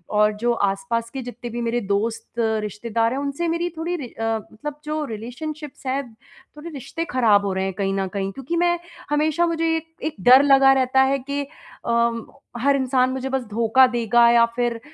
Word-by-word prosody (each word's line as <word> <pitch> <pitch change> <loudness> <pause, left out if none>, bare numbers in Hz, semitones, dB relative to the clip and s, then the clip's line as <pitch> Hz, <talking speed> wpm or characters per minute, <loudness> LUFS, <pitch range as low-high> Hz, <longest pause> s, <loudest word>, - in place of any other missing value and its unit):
और 210 0 +4
जो 240 0 +2
आस-पास 230 +3 -1
के 265 +1 -6
जितने 240 0 -7
भी 240 +1 -4
मेरे 235 +1 0
दोस्त, 205 +3 -1
रिश्तेदार 220 +1 -1
हैं 275 - -2
उनसे 285 +4 -2
मेरी 335 +1 -1
थोड़ी 340 +2 -2
रि 275 -6 -6
अ, 225 - -8 0.3
मतलब 295 +6 -6
जो 305 0 -2
रिलेशनशिप्स 270 +7 -7
हैं 275 +2 0 0.5
थोड़े 320 +3 -8
रिश्ते 310 +3 -5
खराब 215 -5 +3
हो 195 - -1
रहे 190 0 -1
हैं 190 - -3
कहीं 195 0 -1
न 195 -1 -1
कहीं। 195 0 -3
क्योंकि 270 - -5
मैं 345 0 +2 0.3
हमेशा 310 +3 +2
मुझे 330 -1 0
एक 325 0 -7 0.2
एक 310 - -3
डर 255 +3 +8
लगा 270 -1 +6
रहता 265 0 +3
है 270 +1 +3
कि 280 +2 -3 0.4
अ, 235 0 +2 0.5
हर 280 +2 +3
इंसान 255 -1 +2
मुझे 265 0 -3
बस 265 -1 -1
धोखा 235 +4 +4
देगा 235 -1 +3
या 235 0 +6
फ़िर 240 -1 -1
250 Hz, 195 wpm, -22 LUFS, 230-285 Hz, 0.5 s, डर